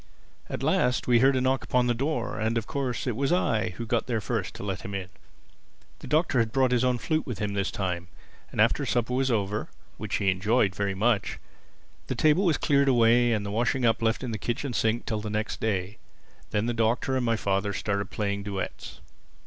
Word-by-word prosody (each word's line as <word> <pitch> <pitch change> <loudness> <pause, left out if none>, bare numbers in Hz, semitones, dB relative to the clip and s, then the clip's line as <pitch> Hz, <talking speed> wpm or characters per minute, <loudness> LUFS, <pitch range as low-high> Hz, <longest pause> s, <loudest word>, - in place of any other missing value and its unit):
At - - -4
last 125 +1 +2
we 120 -1 +4
heard 135 +2 +4
a 130 - +1
knock 130 +1 +1
upon 125 -1 +1
the 120 - +2
door, 125 -1 -2
and 110 +2 0
of 115 - -1
course 130 -2 -3
it 125 -4 -1
was 140 +5 0
I 140 -11 +1
who 115 - -4
got 115 +1 0
there 120 -3 0
first 110 -2 -3
to - - -7
let 100 -1 -3
him 100 -3 -6
in. 95 -2 -4 0.9
The - - -9
Doctor 155 -4 +2
had 115 -1 +1
brought 130 0 +2
his 125 0 +2
own 125 -1 +2
flute 155 +6 -1
with 120 -6 -4
him 105 0 -2
this 100 -1 0
time. 90 -2 -3 0.4
And - - -7
after - - +3
supper 120 0 0
was 130 +1 +1
over 105 -2 -1 0.3
(which - - -3
he 100 -1 +2
enjoyed 100 +2 +2
very 100 0 -2
much) 105 +1 +1 0.7
the - - -2
table 155 +6 +3
was 165 -4 +3
cleared 140 -1 +2
away 120 -1 +4
and 105 -3 0
the 100 - -4
washing 120 +4 +1
up 115 0 +2
left 115 +3 +1
in 125 - -3
the 110 - -4
kitchen 120 +2 -3
sink 115 +1 0
till 110 -1 -2
the 105 - -5
next 105 +1 -2
day. 100 -2 -2 0.5
Then 105 +1 0
the 120 - 0
Doctor 115 +3 +1
and 130 - 0
my 115 -1 +2
father 100 -1 0
started 100 0 -2
playing 100 -1 -2
duets. 100 -1 -6
115 Hz, 220 wpm, -27 LUFS, 105-125 Hz, 0.9 s, we